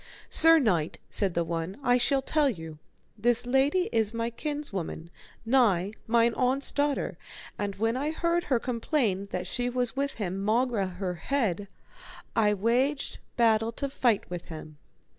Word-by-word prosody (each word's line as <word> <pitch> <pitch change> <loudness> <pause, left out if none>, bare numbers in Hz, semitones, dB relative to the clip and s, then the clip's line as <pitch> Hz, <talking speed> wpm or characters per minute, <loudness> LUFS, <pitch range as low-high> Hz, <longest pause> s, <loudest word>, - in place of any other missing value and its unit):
Sir 325 +1 +7
knight, 180 - +1
said 195 -4 +2
the 170 - +2
one, 165 +2 -4
I 245 0 +3
shall 270 +2 +1
tell 300 0 +2
you, 160 -8 -7 0.4
this 240 +2 +2
lady 275 +8 +2
is 225 -1 +1
my 230 +1 -2
kinswoman 225 - -5 0.3
nigh, 215 -7 +3 0.2
mine 235 +1 +3
aunt's 260 +3 +1
daughter, 285 -1 -1 0.4
and 200 -1 -3
when 225 +3 0
I 285 +4 -1
heard 340 +2 0
her 260 - +2
complain 230 -4 -1
that 180 -1 -3
she 245 +6 -2
was 245 -1 -1
with 280 +1 -1
him 195 -2 -4
maugre 225 -1 +1
her 185 -2 -2
head, 205 -1 -1 0.7
I 210 -2 +3
waged 250 +8 0 0.2
battle 225 -1 +3
to 280 +4 -3
fight 240 -6 +1
with 175 -1 -6
him. 155 -2 -10
230 Hz, 155 wpm, -28 LUFS, 195-270 Hz, 0.7 s, Sir